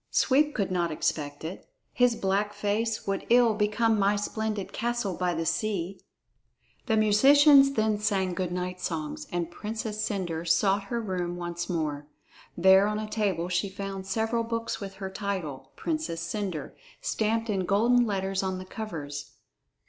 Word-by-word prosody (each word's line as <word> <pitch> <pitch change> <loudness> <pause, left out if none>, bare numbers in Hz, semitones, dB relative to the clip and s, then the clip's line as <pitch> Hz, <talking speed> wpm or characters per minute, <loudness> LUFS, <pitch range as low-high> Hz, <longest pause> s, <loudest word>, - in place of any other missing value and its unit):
Sweep 295 +3 +3
could 200 -4 -1
not 175 -2 +1
expect 145 -1 -2
it. 170 - -7 0.2
His 245 -1 +3
black 200 +1 0
face 210 +2 -1
would 195 -1 -1
ill 240 -2 +5
become 215 +1 +2
my 200 +1 +3
splendid 210 0 -3
castle 240 -4 -1
by 180 -1 0
the 165 0 -2
sea." 195 -2 -2 0.9
The 220 -2 +2
musicians 275 +6 +6
then 215 -3 +1
sang 195 -4 0
good 180 0 -2
night 180 0 -3
songs, 160 -4 -4
and 175 -1 -2
Princess 215 +1 -4
Cendre 175 -6 -2
sought 195 +4 +3
her 235 +4 -2
room 180 -5 -3
once 175 0 -4
more. 150 -4 -2 0.5
There 190 +3 +6
on 210 0 -1
a 215 0 -3
table 195 -6 -1
she 180 +2 0
found 195 -1 -6
several 225 +3 0
books 230 0 -3
with 195 -1 -6
her 190 -1 -6
title, 190 -10 -4
"Princess 310 - -2
Cendre," 170 -3 -4 0.3
stamped 225 +1 0
in 190 -4 -1
golden 235 +4 +4
letters 195 -1 -1
on 190 -1 -2
the 185 - -7
covers. 155 -9 -6
200 Hz, 155 wpm, -28 LUFS, 180-220 Hz, 0.9 s, musicians